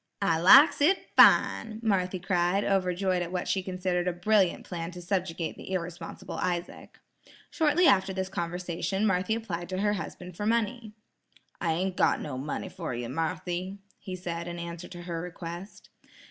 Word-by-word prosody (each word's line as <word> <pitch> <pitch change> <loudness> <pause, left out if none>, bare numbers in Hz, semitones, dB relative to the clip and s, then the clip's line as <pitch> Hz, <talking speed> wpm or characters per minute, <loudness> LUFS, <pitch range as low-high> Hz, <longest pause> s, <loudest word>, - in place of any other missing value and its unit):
"I 165 -5 +2
likes 275 - +8
it 365 +7 +2
fine," 220 -1 +5
Marthy 185 -4 +1
cried, 180 +1 +1
overjoyed 185 -1 +1
at 175 0 -4
what 180 -1 -3
she 190 - +1
considered 180 -1 -2
a 180 - +1
brilliant 190 +1 +2
plan 170 -2 -5
to 180 0 -9
subjugate 175 -2 -2
the - - -9
irresponsible 175 -2 -5
Isaac. 175 -1 -4 0.5
Shortly 320 +2 +3
after 195 - +4
this 190 0 -3
conversation, 180 +2 -2
Marthy 190 +2 +1
applied 175 -7 -5
to 185 - -3
her 205 +2 +1
husband 180 -2 -7
for 205 +4 -3
money. 230 0 -1 0.7
"I 165 -2 +1
ain't 185 +3 -2
got - - +3
no 145 -4 -5
money 145 +7 -4
fer 165 -8 -5
ye, 120 0 -4
Marthy," 175 +5 -3 0.2
he 185 - -6
said 170 -2 -5
in 175 0 -5
answer 170 0 -6
to 175 -1 -10
her 170 -2 -4
request. 175 +2 -8
180 Hz, 165 wpm, -28 LUFS, 175-195 Hz, 0.7 s, likes